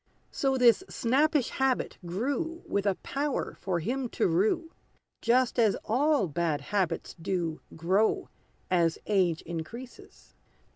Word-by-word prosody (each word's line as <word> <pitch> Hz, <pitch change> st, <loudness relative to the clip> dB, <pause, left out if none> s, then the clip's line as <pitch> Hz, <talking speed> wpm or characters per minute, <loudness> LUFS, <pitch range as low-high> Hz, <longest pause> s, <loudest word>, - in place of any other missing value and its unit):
So, 270 Hz, -1 st, +1 dB
this 245 Hz, +7 st, +5 dB
snappish 280 Hz, +3 st, +2 dB
habit 265 Hz, -1 st, 0 dB
grew 280 Hz, -, -2 dB
With 200 Hz, 0 st, -1 dB
a 195 Hz, -, +2 dB
power 280 Hz, 0 st, -2 dB
for 180 Hz, -3 st, -1 dB
him 250 Hz, +7 st, -2 dB
to -, -, +3 dB
rue; 220 Hz, -, +1 dB, 0.5 s
Just 245 Hz, +1 st, +2 dB
as 220 Hz, -3 st, +4 dB
all 275 Hz, -2 st, +2 dB
bad 160 Hz, -1 st, 0 dB
habits 180 Hz, +2 st, -2 dB
do 165 Hz, -3 st, -2 dB, 0.2 s
Grow, 190 Hz, +7 st, +2 dB, 0.4 s
as 170 Hz, -3 st, +3 dB
age 185 Hz, -6 st, +1 dB
increases. 170 Hz, +10 st, -9 dB
220 Hz, 125 wpm, -29 LUFS, 175-265 Hz, 0.5 s, this